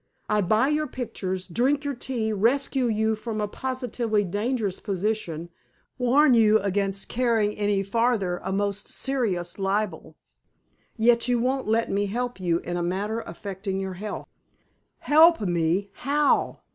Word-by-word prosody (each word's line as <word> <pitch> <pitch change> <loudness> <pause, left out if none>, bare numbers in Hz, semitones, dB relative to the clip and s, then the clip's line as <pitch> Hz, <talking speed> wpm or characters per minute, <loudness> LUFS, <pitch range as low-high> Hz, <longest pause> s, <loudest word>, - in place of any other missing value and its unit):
I 210 0 +2
buy 215 +8 +2
your 305 0 0
pictures, 195 -8 -4
drink 265 - +1
your 285 - -1
tea, 235 -3 -2
rescue 255 +5 +1
you 220 0 +1
from 215 0 -5
a 210 - 0
positively 240 -3 -2
dangerous 205 +1 -2
position, 190 -5 -3 0.5
warn 260 +3 +4
you 220 -2 +5
against 195 -1 -1
carrying 225 -4 +1
any 205 -1 0
farther 200 -4 0
a - - -3
most 200 +1 -1
serious 205 -10 -1
libel, 195 -5 -2 0.8
yet 235 +1 +3
you 245 -1 +2
won't 260 +1 -1
let 225 +1 +1
me 200 +1 0
help 245 +2 -3
you 175 -2 +1
in 175 0 -4
a - - -1
matter 200 +6 -2
affecting 195 +2 -5
your 190 -1 -3
health!" 205 +3 -6 0.8
"Help 325 +3 +6
me? 175 +1 0
How?" 290 +2 +1
215 Hz, 145 wpm, -25 LUFS, 195-245 Hz, 0.8 s, Help